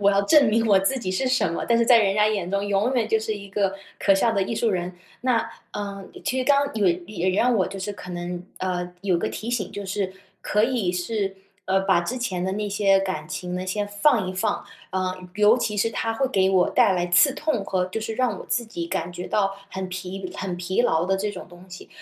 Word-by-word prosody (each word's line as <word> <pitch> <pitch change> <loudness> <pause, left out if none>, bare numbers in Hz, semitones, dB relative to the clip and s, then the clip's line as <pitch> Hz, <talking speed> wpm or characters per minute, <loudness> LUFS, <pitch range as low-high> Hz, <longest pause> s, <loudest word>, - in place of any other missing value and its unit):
我 200 0 +5
要 200 0 +3
证 285 +4 +5
明 225 +2 +2
我 200 -3 +6
自 255 +8 0
己 185 -5 -3
是 255 +8 0
什 255 -9 +2
么， - - -3
但 235 - +4
是 235 - +3
在 235 -1 +7
人 195 -3 +2
家 210 0 +4
眼 200 -5 -1
中 200 +1 0
永 205 +6 +1
远 230 -3 +2
就 220 - +3
是 220 0 -2
一 200 -1 -9
个 195 -1 0 0.2
可 195 - +4
笑 225 +4 +2
的 200 - +1
艺 195 - -2
术 225 0 +1
人。 180 -1 -2 0.3
那， 245 -2 +1 0.3
呃， 200 -1 -5 0.2
其 260 -3 0
实 255 - 0
刚 280 0 +3
也 200 -5 +3
也 185 -3 -2
让 240 +6 +2
我 190 -5 +2
就 195 - -7
是 195 +2 -3
可 190 -2 -11
能 175 0 -5 0.2
呃， 180 -1 -3
有 185 -4 +2
个 - - -1
提 225 - -5
醒 230 -6 -2
就 205 - -5
是 190 -1 -2 0.3
可 210 +1 +2
以 230 -7 0
是， 195 +2 -2 0.3
呃， 190 +1 +2
把 190 -3 +3
之 200 +9 -3
前 185 -8 -2
的 190 - -1
那 210 +1 -2
些 195 -1 +3
感 185 -6 -3
情 180 0 -4
呢 185 +1 -3
先 205 +2 -1
放 205 +1 +2
一 185 - -3
放， 205 +3 -1 0.3
呃， 185 -1 -1 0.2
尤 210 +3 +6
其 210 -3 -1
是 215 +3 +1
它 225 0 -1
会 270 +4 +1
给 190 -6 +2
我 185 -2 +3
带 195 - +4
来 175 -1 0
刺 220 +11 +5
痛 295 -9 -1
和 185 -2 0
就 185 +4 -4
是 220 0 -4
让 235 -5 0
我 - - -8
自 240 - 0
己 170 -7 -5
感 170 +1 -3
觉 175 +1 -6
到 195 -2 +1 0.2
很 190 0 -4
疲 185 +1 -5
很 190 -2 -3
疲 180 +4 -1
劳 160 -7 +2
的 195 - +2
这 205 +2 -2
种 190 - -8
东 175 +1 -15
西， 185 - -11
200 Hz, 265 characters per minute, -24 LUFS, 185-220 Hz, 0.3 s, 在